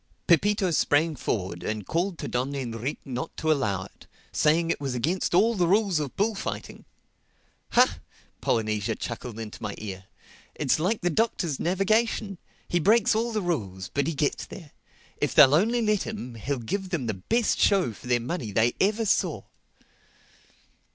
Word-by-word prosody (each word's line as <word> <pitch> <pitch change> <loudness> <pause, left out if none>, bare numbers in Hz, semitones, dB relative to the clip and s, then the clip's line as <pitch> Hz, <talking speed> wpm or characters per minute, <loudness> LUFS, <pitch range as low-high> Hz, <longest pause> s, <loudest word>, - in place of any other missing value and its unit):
Pepito 190 +3 +3
sprang 155 0 +2
forward 95 -8 -3
and 105 -2 -3
called 175 - -1
to - - -5
Don 130 +3 -2
Enrique 125 +1 -4
not 130 +4 -5
to 160 - +1
allow 105 -10 0
it, - - -16 0.2
saying 165 +2 +2
it - - -3
was 135 -3 -2
against 170 +9 0
all 225 +6 +5
the 180 -5 +1
rules 195 -3 +3
of 140 -3 -4
bullfighting. 205 0 -3 0.9
("Ha!" - - +4 0.4
Polynesia 110 -3 0
chuckled 115 -3 -6
into 110 -2 -7
my 105 -2 -4
ear. 95 -3 -7 0.5
"It's 145 0 +1
like 190 +7 0
the 175 -1 +1
Doctor's 175 - 0
navigation: 195 +2 +1 0.3
he 175 - +1
breaks 215 +6 +4
all 230 +2 0
the 215 -3 -1
rules; 100 - -3
but 140 0 0
he 165 - -2
gets 145 0 -1
there. 155 -6 -11 0.5
If - - -1
they'll 140 -2 +8
only 230 +9 +3
let 210 -2 +2
him, 165 - -5
he'll 135 +5 -3
give 185 - -3
them 165 -9 -2
the 110 - -1
best 225 - 0
show 190 - +3
for 115 - -13
their 120 -1 +3
money 120 - -4
they 110 +4 +2
ever 215 +3 +2
saw.") 200 - +1
155 Hz, 165 wpm, -26 LUFS, 120-195 Hz, 0.9 s, they'll